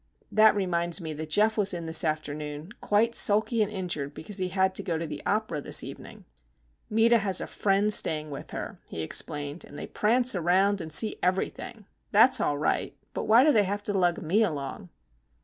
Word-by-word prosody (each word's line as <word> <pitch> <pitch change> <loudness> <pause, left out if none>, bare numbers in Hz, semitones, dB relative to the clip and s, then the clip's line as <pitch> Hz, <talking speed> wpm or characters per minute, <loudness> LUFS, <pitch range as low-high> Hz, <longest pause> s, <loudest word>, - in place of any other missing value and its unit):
That 215 0 +5
reminds 175 -3 -1
me 160 -3 -5
that 155 +1 -7
Geof 215 +6 +2
was 200 -3 +2
in 170 -1 -6
this 160 0 +3
afternoon, 150 +1 -4
quite 225 +3 +1
sulky 220 +2 +2
and 210 0 0
injured 165 -8 -4
because 190 +6 -5
he 185 - -1
had 190 +1 0
to - - 0
go 165 -2 -3
to 165 - -4
the 150 -2 -7
opera 210 -7 -1
this - - +1
evening. - - -10 0.6
"Meta 230 +2 +4
has 195 -2 0
a - - -3
friend 205 +1 +1
staying 155 -5 +1
with 140 - -8
her," - - -7
he 80 - -5
explained. 145 - -2
"And 145 - -12
they - - -6
prance 245 +4 +2
round 190 +3 +1
and 160 -1 -8
see 215 +8 +3
everything. 190 +3 -3 0.3
That's 225 +5 +5
all 145 - 0
right; 150 - -2 0.2
but - - -4
why 230 +4 +6
do 305 - +5
they 215 -6 +3
have 205 +2 -3
to 205 - -3
lug 175 -3 +1
me 185 +8 +1
along?" 145 - -3
190 Hz, 200 wpm, -27 LUFS, 155-210 Hz, 0.6 s, why